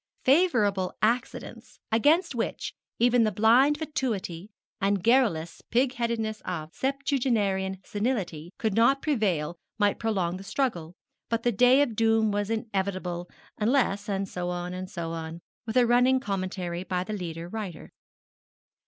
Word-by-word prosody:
Favourable 240 Hz, -, +3 dB
accidents, 235 Hz, +3 st, -2 dB
against 300 Hz, -, +3 dB
which 235 Hz, -2 st, -3 dB, 0.2 s
even 245 Hz, 0 st, +4 dB
the 215 Hz, -, +2 dB
blind 240 Hz, +9 st, +4 dB
fatuity 220 Hz, -, -3 dB, 0.3 s
and 195 Hz, -1 st, +1 dB
garrulous 225 Hz, -10 st, +2 dB
pig 250 Hz, +2 st, +2 dB
headedness 230 Hz, -3 st, -2 dB
of 160 Hz, -3 st, -5 dB
septuagenarian 235 Hz, -9 st, 0 dB
senility 205 Hz, -8 st, -2 dB
could 220 Hz, -3 st, -1 dB
not 235 Hz, +6 st, +3 dB
prevail 185 Hz, -, 0 dB, 0.2 s
might 205 Hz, -1 st, +2 dB
prolong 190 Hz, -6 st, -1 dB
the 190 Hz, -, -9 dB
struggle; 180 Hz, -, -2 dB, 0.3 s
but 230 Hz, 0 st, -1 dB
the 240 Hz, -, +3 dB
day 250 Hz, +6 st, +5 dB
of 235 Hz, -6 st, -3 dB
doom 225 Hz, -1 st, +3 dB
was 205 Hz, 0 st, -1 dB
inevitable, 190 Hz, -5 st, -2 dB, 0.3 s
unless 215 Hz, -3 st, +1 dB
and 195 Hz, -1 st, -1 dB
so 180 Hz, -1 st, -4 dB
on, 175 Hz, 0 st, -4 dB
and 185 Hz, 0 st, -6 dB
so 170 Hz, -3 st, -4 dB
on, 165 Hz, 0 st, -5 dB, 0.3 s
with 225 Hz, -, -1 dB
a 250 Hz, -, +6 dB
running 250 Hz, +2 st, +4 dB
commentary 185 Hz, -5 st, -3 dB
by 180 Hz, -2 st, -2 dB
the 215 Hz, -, -5 dB
leader 170 Hz, -4 st, -5 dB
writer. 190 Hz, -4 st, -6 dB
210 Hz, 140 wpm, -27 LUFS, 185-245 Hz, 0.3 s, a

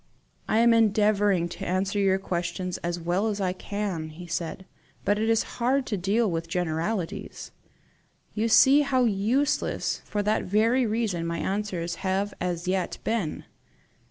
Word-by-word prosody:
"I -, -, +2 dB
am 235 Hz, +1 st, +5 dB
endeavouring 205 Hz, -4 st, +3 dB
to -, -, -7 dB
answer 190 Hz, +3 st, 0 dB
your 195 Hz, -1 st, +3 dB
questions 180 Hz, -1 st, -3 dB
as 175 Hz, 0 st, -3 dB
well 175 Hz, +5 st, 0 dB
as 210 Hz, -2 st, -2 dB
I 185 Hz, -2 st, 0 dB
can," 190 Hz, -5 st, -4 dB
he 165 Hz, +3 st, -10 dB
said; 170 Hz, +2 st, -4 dB, 0.4 s
"but 205 Hz, +1 st, +2 dB
it 220 Hz, +1 st, +1 dB
is 225 Hz, -1 st, +3 dB, 0.2 s
hard 260 Hz, +3 st, +2 dB
to 220 Hz, -, -2 dB
deal 200 Hz, +3 st, +1 dB
with 165 Hz, 0 st, -3 dB
generalities. 170 Hz, +2 st, -3 dB, 0.8 s
You 220 Hz, +1 st, 0 dB
see 270 Hz, +6 st, +7 dB
how 260 Hz, -3 st, +2 dB
useless, 230 Hz, +6 st, 0 dB
for 205 Hz, -1 st, -2 dB
that 210 Hz, +1 st, +1 dB
very 225 Hz, +6 st, +2 dB
reason, 210 Hz, -7 st, -1 dB
my 170 Hz, 0 st, -2 dB
answers 180 Hz, -3 st, -2 dB
have 195 Hz, +1 st, -1 dB
as 175 Hz, -1 st, -2 dB
yet 185 Hz, 0 st, -1 dB
been! 220 Hz, -9 st, -2 dB
200 Hz, 155 wpm, -26 LUFS, 175-220 Hz, 0.8 s, see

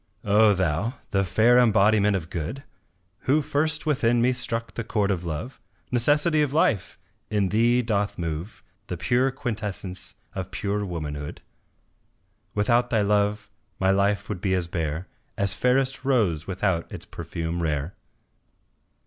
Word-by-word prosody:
O 105 Hz, 0 st, +5 dB
Thou! 95 Hz, -, 0 dB, 0.2 s
the 100 Hz, -2 st, +2 dB
fair 110 Hz, +7 st, +4 dB
embodiment 105 Hz, -3 st, +4 dB
of 85 Hz, -2 st, -4 dB
good, 100 Hz, -, -4 dB, 0.6 s
Who 140 Hz, +4 st, +4 dB
first 155 Hz, +2 st, 0 dB
within 120 Hz, -6 st, +2 dB
me 125 Hz, +2 st, +3 dB
struck 115 Hz, -2 st, -3 dB
the 115 Hz, -, -4 dB
chord 105 Hz, -1 st, 0 dB
of 90 Hz, -2 st, -2 dB
Love, 85 Hz, -, -5 dB, 0.3 s
Necessity 150 Hz, +6 st, +3 dB
of 145 Hz, -2 st, 0 dB
Life! 115 Hz, -, +1 dB, 0.3 s
in 105 Hz, -3 st, +1 dB
thee 120 Hz, +4 st, +3 dB
doth 105 Hz, -3 st, -1 dB
move 85 Hz, +4 st, -5 dB, 0.2 s
The -, -, -4 dB
pure 125 Hz, +2 st, +2 dB
quintessence 105 Hz, -7 st, -4 dB, 0.2 s
of 95 Hz, -2 st, -5 dB
pure 105 Hz, 0 st, -2 dB
womanhood, 75 Hz, -4 st, -5 dB, 1.1 s
Without 120 Hz, +4 st, +2 dB
thy 110 Hz, -3 st, +2 dB
love 105 Hz, +1 st, +1 dB, 0.3 s
my 95 Hz, 0 st, +3 dB
life 100 Hz, +1 st, +1 dB
would 90 Hz, -, -5 dB
be 95 Hz, -1 st, +1 dB
as 90 Hz, -2 st, -1 dB
bare 85 Hz, 0 st, -3 dB, 0.3 s
As 100 Hz, 0 st, +1 dB
fairest 130 Hz, +1 st, +1 dB
rose 105 Hz, -, +1 dB
without 95 Hz, -3 st, -1 dB
its -, -, -7 dB
perfume 85 Hz, +1 st, -4 dB
rare. 75 Hz, +1 st, -1 dB
105 Hz, 140 wpm, -25 LUFS, 90-120 Hz, 1.1 s, O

